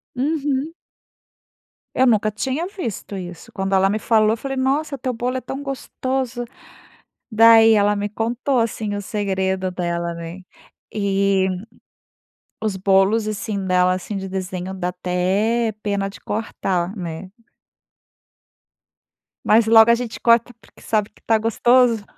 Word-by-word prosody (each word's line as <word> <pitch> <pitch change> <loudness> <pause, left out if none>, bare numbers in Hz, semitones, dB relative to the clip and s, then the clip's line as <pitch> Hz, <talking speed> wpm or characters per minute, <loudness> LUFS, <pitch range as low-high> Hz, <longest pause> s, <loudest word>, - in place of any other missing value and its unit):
Uhum. 285 +2 -1 1.2
Eu 260 - +4
nunca 215 -2 +2
tinha 265 +10 -2
visto 235 - -6
isso. 175 -2 -9
Quando 195 0 -1
ela 190 0 +4
me 210 +2 -1
falou, 215 -1 +3
eu 225 - -1
falei: 270 +3 -5
"Nossa, 280 +3 0
teu 255 0 -3
bolo 245 +2 -2
é - - -4
tão 265 +3 -6
gostoso". 260 -2 -3 0.9
Daí 225 0 +7
ela 205 -1 +3
me 205 0 -2
contou 240 +5 -1
assim 220 -2 -2
o 205 - -3
segredo 190 -2 -2
dela 170 -1 -2
né. 170 +2 -8 0.5
E 195 -2 +1 1.2
os 215 -3 -1
bolos, 195 +3 +3
assim, 205 -2 -3
dela, 180 0 +3
assim, 185 +3 -5
de 190 0 -5
desenho, 185 0 -4
dá 180 -2 -3
até 190 +6 0
pena 200 -1 -1
de 195 - -13
cortar, 190 -3 -2
né. 175 -1 -6 2.2
Mas 220 +1 +4
logo 225 0 +7
a - - +5
gente 235 -1 -5
corta 235 +1 +3
porque 200 - -21
sabe 215 -1 0
que - - -26
tá 225 - +3
gostoso. 230 +1 +3
215 Hz, 140 wpm, -21 LUFS, 190-235 Hz, 2.2 s, Daí